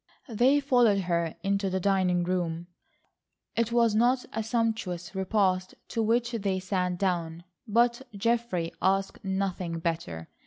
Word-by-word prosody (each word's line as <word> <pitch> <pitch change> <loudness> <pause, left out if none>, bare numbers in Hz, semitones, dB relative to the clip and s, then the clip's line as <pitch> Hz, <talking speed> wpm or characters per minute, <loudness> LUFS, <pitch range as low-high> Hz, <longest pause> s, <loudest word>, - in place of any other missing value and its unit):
They 250 +6 +4
followed 245 -8 +3
her 170 -2 -1
into 200 0 0
the 190 0 -1
dining 185 -2 +2
room. 175 -2 -2 0.9
It 230 0 +1
was 235 -2 +3
not 245 +4 +3
a 225 - -1
sumptuous 220 -6 -2
repast 190 -1 0
to 230 - -1
which 235 +2 +1
they 200 -5 -1
sat 185 -1 -1
down, 175 -3 -1 0.2
but 235 +3 +2 0.2
Geoffrey 230 -6 0
asked 195 +2 0
nothing 190 -3 -2
better. 160 - -3
195 Hz, 130 wpm, -28 LUFS, 180-230 Hz, 0.9 s, They